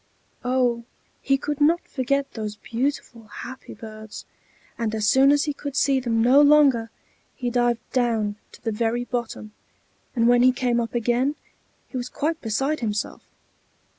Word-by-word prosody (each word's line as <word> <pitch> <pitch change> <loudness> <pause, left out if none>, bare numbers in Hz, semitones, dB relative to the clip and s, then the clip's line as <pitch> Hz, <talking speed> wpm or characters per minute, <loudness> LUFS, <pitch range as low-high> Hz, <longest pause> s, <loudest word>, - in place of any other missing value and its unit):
Oh! 250 -2 +1 0.4
he 275 0 +2
could 295 +1 -4
not 330 +4 +3
forget 275 +1 -1
those 215 -2 -5
beautiful, 235 -1 -3
happy 260 +5 -9
birds; 215 -1 -10 0.5
and 220 -2 -2
as 215 -1 0
soon 265 +5 +6
as 290 0 +3
he 295 - -1
could 280 -1 -7
see 275 -2 +3
them 230 -3 0
no 260 +4 +6
longer, 285 -6 +5 0.5
he 245 -3 -3
dived 240 -1 0
down 225 -5 0 0.2
to - - -16
the 225 - -1
very 230 +2 0
bottom, 235 -3 -4 0.6
and 230 -1 +3
when 245 0 +5
he 255 +1 +6
came 245 -1 0
up 235 0 -3
again, 245 +5 +1 0.5
he 260 - -6
was 245 - -4
quite 315 +2 -2
beside 270 +7 -1
himself. 210 -4 -3
245 Hz, 160 wpm, -24 LUFS, 225-275 Hz, 0.6 s, soon